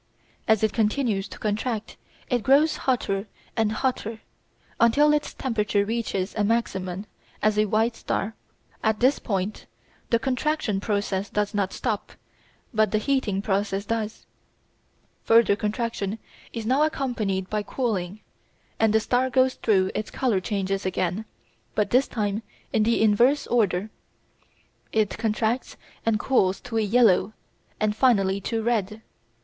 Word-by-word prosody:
As 220 -1 +3
it 220 - +2
continues 215 -3 +1
to - - -10
contract 220 +1 -2 0.3
it 245 -2 +1
grows 280 +7 +4
hotter 205 -6 -1 0.3
and 220 -2 +1
hotter 225 -2 -2 0.6
until 285 +6 +5
its 295 0 0
temperature 210 -5 0
reaches 210 -4 -2
a 210 - +1
maximum 195 -4 -1 0.4
as 215 0 +3
a 210 0 +2
white 225 +3 +1
star. 220 0 -2 0.5
At 220 -1 +1
this 260 +3 +3
point 195 0 -3 0.4
the 230 - +4
contraction 255 -3 -1
process 200 -1 -1
does 210 +1 -1
not 200 -2 0
stop, 220 -5 -3 0.6
but 215 -1 +3
the 215 - +1
heating 215 -5 0
process 200 0 -1
does. 220 0 -3 1.0
Further 225 -2 +5
contraction 210 -1 -2 0.3
is 230 -2 -5
now 260 +5 +2
accompanied 235 -11 -1
by 210 +1 -1
cooling, 205 -4 -2 0.6
and 220 -1 +3
the 220 - +5
star 250 +3 +1
goes 260 0 +3
through 190 -4 +2
its 210 0 -3
colour 245 -7 +1
changes 195 0 -2
again, 185 +2 -1 0.5
but 210 -2 +1
this 255 +3 +4
time 210 -1 -2 0.3
in 220 - +3
the 225 +1 +3
inverse 240 +7 +4
order. 210 -3 +1 1.0
It 215 -3 +1
contracts 225 +2 -1 0.3
and 225 -2 +1
cools 195 -8 +2
to 240 -2 -4
yellow 215 -2 +3 0.5
and 210 0 +1
finally 200 -6 +3
to 225 +3 -2
red. 220 -2 -1
215 Hz, 135 wpm, -25 LUFS, 200-235 Hz, 1.0 s, until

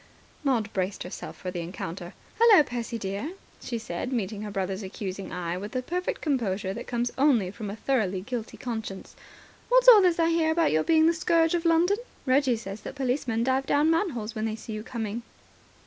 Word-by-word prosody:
Maud 235 -7 0
braced 190 +1 -2
herself 180 - -8
for 180 - -5
the 180 - -4
encounter. 175 +1 -6 0.2
"Hullo, 450 -8 +8
Percy, 240 -3 -4
dear," 200 - -4 0.3
she 235 - -3
said, 220 +2 -4
meeting 210 -4 -2
her 215 - -5
brother's 195 0 -2
accusing 190 0 -6
eye 180 0 -3
with 205 +2 -7
the 255 -1 -1
perfect 360 +6 -3
composure 205 - -1
that 235 +4 -7
comes 240 0 -1
only 245 -10 +3
from 210 0 -6
a 200 - -5
thoroughly 215 -6 0
guilty 230 +2 -5
conscience. 220 -5 -6 0.5
"What's - - +5
all 450 -5 +11
this 360 -3 +3
I 330 -1 +3
hear 330 -1 +2
about 320 0 +2
your 155 0 +2
being 320 -1 +4
the 335 - +5
Scourge 330 0 +2
of 345 -1 0
London? 340 +4 +4 0.3
Reggie 260 -2 +3
says 200 -1 -7
that 270 - -8
policemen 250 -4 0
dive 265 +1 +1
down 295 +3 +3
manholes 285 - -1
when 220 -1 -2
they 220 -1 -2
see 225 0 -8
you 215 - -4
coming." 225 -1 -4
235 Hz, 195 wpm, -27 LUFS, 200-300 Hz, 0.5 s, all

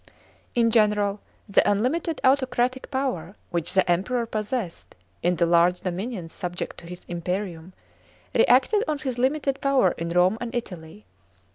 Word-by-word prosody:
In 230 -1 +3
general, 210 -2 +2 0.3
the 200 - +4
unlimited 285 +10 0
autocratic 260 -1 +1
power 250 - -2 0.2
which 170 0 -2
the 190 - +4
Emperor 200 +8 +1
possessed 215 -4 -4 0.3
in 175 +1 +2
the 170 - +2
large 175 +1 +3
dominions 185 -1 -4
subject 175 -1 -5
to 170 - -12
his 180 +1 -9
iniperium, 175 0 -4 0.6
reacted 335 - +4
on 305 -1 0
his 260 -3 -4
limited 275 +1 0
power 270 -9 +3
in 170 0 -3
Rome 180 +5 +3
and 240 0 -5
Italy. 180 -4 -6
210 Hz, 140 wpm, -25 LUFS, 175-255 Hz, 0.6 s, the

